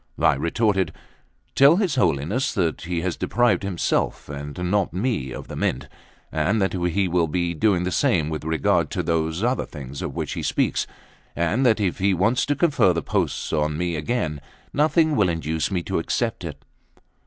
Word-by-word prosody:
I - - +4
retorted: 95 -1 0 0.6
"Tell 140 +4 +6
his 190 -5 +1
Holiness 95 - 0
that 85 -6 0
he 85 0 -2
has 90 -2 -1
deprived 120 +2 +2
himself 95 -7 -1
and 70 0 -6
not 100 -3 +1
me 100 - -1
of - - -7
the - - -7
Mint, 65 - -1 0.4
and 80 +8 +1
that 95 -1 +1
he 90 +1 0
will 85 -1 +1
be 85 +2 -1
doing 90 +1 +2
the 90 - -1
same 90 - +2
with 80 -1 -4
regard 80 +1 +1
to - - -1
those 80 +3 -1
other 125 +1 0
things 70 -2 -8
of - - -4
which - - -3
he - - -3
speaks; - - 0 0.5
and 85 +10 +1
that 110 -2 +3
if 95 -4 -1
he 95 0 +2
wants 110 +9 +2
to 145 - +1
confer 145 - +3
the 85 - -2
post - - -1
on 75 0 0
me 85 0 -1
again, 80 - -2 0.3
nothing 155 +1 +3
will 100 -7 +3
induce 80 -1 -1
me 90 -3 -1
to 95 - -1
accept 115 +4 -2
it." 70 -4 -8
90 Hz, 185 wpm, -23 LUFS, 80-110 Hz, 0.6 s, Tell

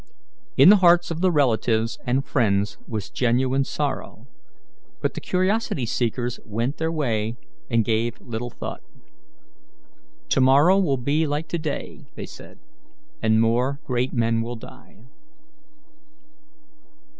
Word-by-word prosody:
In 135 +6 +8
the 210 - +8
hearts 175 -2 +4
of 165 +1 -4
the 185 - +4
relatives 115 -6 +1
and 130 +2 +1
friends 100 -4 0
was 110 -3 -5
genuine 130 +2 +1
sorrow, - - -4 0.7
but - - -1
the - - -6
curiosity 185 - 0
seekers 120 +1 -2
went 115 +6 -3
their 160 0 -1
way 115 -8 -1 0.3
and 115 -2 +2
gave 115 +1 -1
little 120 0 -5
thought. - - -7 1.5
"To - - +3
morrow 145 +9 +5
will 145 -8 +1
be 145 +5 0
like 145 +2 -2
to 170 - -2
day," 155 -2 -5
they - - -6
said, - - -13 0.6
"and 110 0 +3
more 125 +5 +1
great 125 0 -1
men 115 -1 +1
will 120 +1 -4
die." 115 - -14
125 Hz, 130 wpm, -23 LUFS, 115-150 Hz, 1.5 s, In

